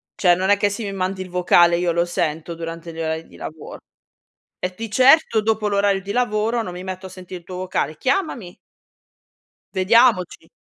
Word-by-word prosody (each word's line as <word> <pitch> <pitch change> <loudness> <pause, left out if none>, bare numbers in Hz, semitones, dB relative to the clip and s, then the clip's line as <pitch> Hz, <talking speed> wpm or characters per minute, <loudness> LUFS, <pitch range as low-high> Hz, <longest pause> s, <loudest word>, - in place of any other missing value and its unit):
cioè 175 -2 +4
non 190 +2 -1
è 205 - +5
che 205 +1 +1
se 205 +3 -5
mi 200 -1 -4
mandi 190 0 -3
il 185 - -7
vocale 175 -1 +4
io 175 0 0
lo 170 +1 +1
sento 170 -2 -3
durante 165 0 -7
gli 165 - -9
orari 160 0 -3
di - - -18
lavoro, 155 -1 -9 0.8
e 180 - -3
di 225 +3 -7
certo 255 -2 +5
dopo 220 -1 0
l'orario 200 -1 +1
di 200 +1 -6
lavoro 230 -1 0
non 180 - -6
mi 180 +1 -7
metto 185 0 -6
a - - -8
sentire 185 -1 -9
il 170 - -28
tuo 185 - -7
vocale, 180 -4 -2
chiamami. 255 - -2 1.2
Vediamoci. 205 -1 +2
185 Hz, 190 wpm, -21 LUFS, 175-210 Hz, 1.2 s, è